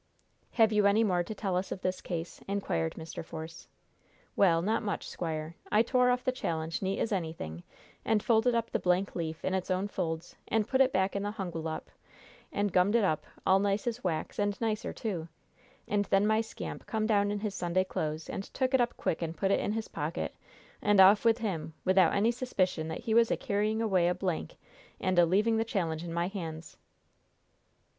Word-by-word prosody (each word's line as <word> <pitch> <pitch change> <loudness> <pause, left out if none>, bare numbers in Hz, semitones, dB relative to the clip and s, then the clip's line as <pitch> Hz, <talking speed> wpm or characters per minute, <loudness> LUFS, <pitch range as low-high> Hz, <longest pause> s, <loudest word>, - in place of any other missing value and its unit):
"Have 225 -2 +4
you 210 -1 +4
any 210 +3 +4
more 180 -5 +2
to 215 +5 -6
tell 195 -4 -2
us 185 +1 -2
of - - -3
this 185 -1 -2
case?" 170 -1 -5
inquired 140 - -1
Mr. 160 0 -7
Force. 160 +1 -8 0.7
"Well, 170 -4 +4
not 220 +4 +1
much, 205 -2 -3
squire. 160 -1 -4 0.2
I 215 +2 +5
tore 250 +1 +3
off 250 0 +1
the 255 - +1
challenge 165 -10 -3
neat 195 +1 -1
as 225 - -1
anything, 160 - -3 0.4
and 220 -2 +1
folded 235 +1 +3
up 230 0 -1
the - - 0
blank 180 +2 +1
leaf 160 -2 -4
in 190 - 0
its 190 -1 -2
own 185 +2 0
folds 170 -4 -4
and 220 -1 +1
put 260 +2 +2
it 265 -1 +5
back 190 +1 +1
in 200 - 0
the 205 +1 -3
hungwallop, 165 -6 -5 0.6
and 205 -1 0
gummed 185 +4 +4
it 235 - +4
up 155 -6 0 0.2
all 190 +1 +5
nice 200 +1 0
as 240 0 -3
wax, 170 0 -2
and 205 -1 0
nicer, 220 -2 -1
too; 180 -8 -4 0.6
and 205 0 +1
then 195 +1 +3
my 220 +1 +3
scamp 225 - -7
come 220 -1 -1
down 205 -2 +3
in 205 0 -2
his 210 -2 -2
Sunday 180 0 +1
clothes, 155 -4 -3
and 195 - -4
took 260 0 0
it 265 - +5
up 240 0 -1
quick 160 - -1
and 165 0 -3
put 195 -1 +1
it - - +3
in - - -1
his 220 0 -3
pocket, - - -3 0.5
and 205 -1 +3
off 195 +2 +8
with 230 -1 +4
him, 180 -9 -3
without 185 -2 +5
any 215 +4 +3
suspicion 190 -10 -1
that 160 - -5
he 230 -2 -1
was 230 0 +5
a - - +1
carrying 215 +2 0
away 185 -5 +3
a 180 - +1
blank 180 -2 -3 0.4
and 185 -2 +2
a 170 - +6
leaving 215 +6 +3
the 225 - +2
challenge 170 -8 -2
in 170 - -5
my 170 +1 0
hands!" 165 -5 -6
195 Hz, 210 wpm, -30 LUFS, 170-220 Hz, 0.7 s, off